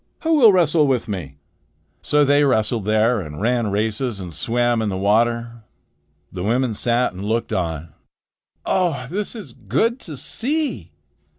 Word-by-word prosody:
Who 325 -1 +2
will 235 -7 +7
wrestle 165 -5 +3
with 130 -3 0
me?" 85 -9 -6 0.6
So 150 0 +3
they 145 +1 +4
wrestled 110 -5 +1
there 110 +2 +2
and 75 -3 -8
ran 120 +1 +1
races 110 +2 -1
and 90 -3 -7
swam 120 +8 0
in 110 - -1
the 95 - -3
water. 115 +4 +1 0.7
The 90 - -6
women 120 +4 0
sat 120 +2 0
and 95 +2 -8
looked 115 +3 -1
on. 80 -3 -3 0.7
"Oh, 165 -9 0
this 205 +5 -3
is 190 - -9
good 135 - -1
to 155 - -8
see!" 295 - -2
120 Hz, 155 wpm, -21 LUFS, 105-145 Hz, 0.7 s, will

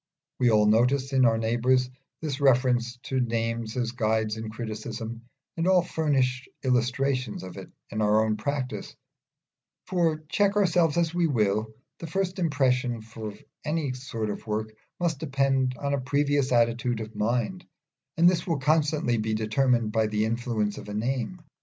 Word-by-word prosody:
We 125 - +4
all 105 -2 +4
notice 125 +6 +3
in 130 -1 +5
our 115 -1 +4
neighbours 120 +3 +2 0.4
this 145 -3 -3
reference 125 -2 +3
to 130 - -1
names 115 -1 -1
as 120 -2 0
guides 110 -2 0
in 110 0 -5
criticism, 110 +1 -6 0.3
and 165 +1 -1
all 185 -2 +5
furnish 135 -6 0
illustrations 130 -1 0
of 95 -1 -8
it - - -9 0.2
in 110 - -2
our 105 +1 +4
own 110 -1 +1
practice; 130 +4 -4 0.9
for, 165 -4 0
check 200 +5 +2
ourselves 175 -5 +3
as 170 -1 +1
we 175 -1 +2
will, 110 -4 0 0.2
the 165 - -6
first 190 +2 -2
impression 130 -7 +1
from 110 -1 -8 0.3
any 150 -3 -1
sort 115 -4 -4
of 105 - -8
work 110 0 -2 0.3
must 165 -5 0
depend 135 -3 +1
on 140 +3 -2
a 140 - 0
previous 140 +1 +1
attitude 120 0 +2
of 110 0 -6
mind, 120 - -1 0.5
and 170 +1 +6
this 180 0 +2
will 165 -3 +1
constantly 150 -3 +2
be 110 0 -1
determined 110 +1 +1
by 110 0 +2
the 105 0 0
influences 110 -2 -1
of - - -10
a 105 - -5
name. 130 - -2
125 Hz, 160 wpm, -27 LUFS, 110-145 Hz, 0.9 s, and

